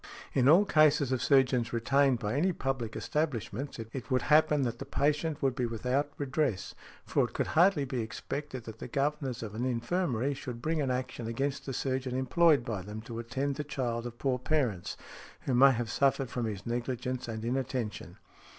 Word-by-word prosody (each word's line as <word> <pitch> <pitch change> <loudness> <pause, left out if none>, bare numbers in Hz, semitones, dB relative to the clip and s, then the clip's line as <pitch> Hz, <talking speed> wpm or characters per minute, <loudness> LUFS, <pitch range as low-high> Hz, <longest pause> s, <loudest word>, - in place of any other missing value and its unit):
In 130 0 +4
all 180 +7 +7
cases 155 -6 +4
of 130 -2 0
surgeons 125 -3 +3
retained 135 +3 +3
by 105 -1 -3
any 175 +7 +2
public 130 -7 -3
establishments, 140 -3 -2
it 115 +4 -7
would 130 -1 +1
happen 150 -1 +4
that 120 -1 -2
the - - -5
patient 150 +1 0
would 135 -2 +3
be 125 -1 -1
without 125 +6 -1
redress, 130 - -1 0.3
for - - +2
it - - -9
could - - 0
hardly 165 -3 +4
be 125 -2 -2
expected 130 +4 -5
that 110 0 -9
the - - -6
governors 135 -1 -1
of 105 -2 -6
an 115 +3 -3
infirmary 130 +1 0
should 125 -3 -6
bring 155 +4 -1
an 135 - 0
action 125 -2 -3
against 135 +5 -2
the 135 - -3
surgeon 130 0 -2
employed 150 0 +4
by 105 -5 -3
them 105 +3 -7
to 115 0 -7
attend 135 +4 -2
the 150 - -2
child 120 -5 -2
of 120 0 -9
poor 130 -1 0
parents, 125 - -1 0.4
who 135 - -2
may 135 +3 +7
have 120 -2 -2
suffered 135 -2 +1
from 120 -2 -2
his 100 -3 -5
negligence 125 +1 -3
and 110 -1 -5
inattention". 125 -3 -3
130 Hz, 185 wpm, -30 LUFS, 115-140 Hz, 0.4 s, all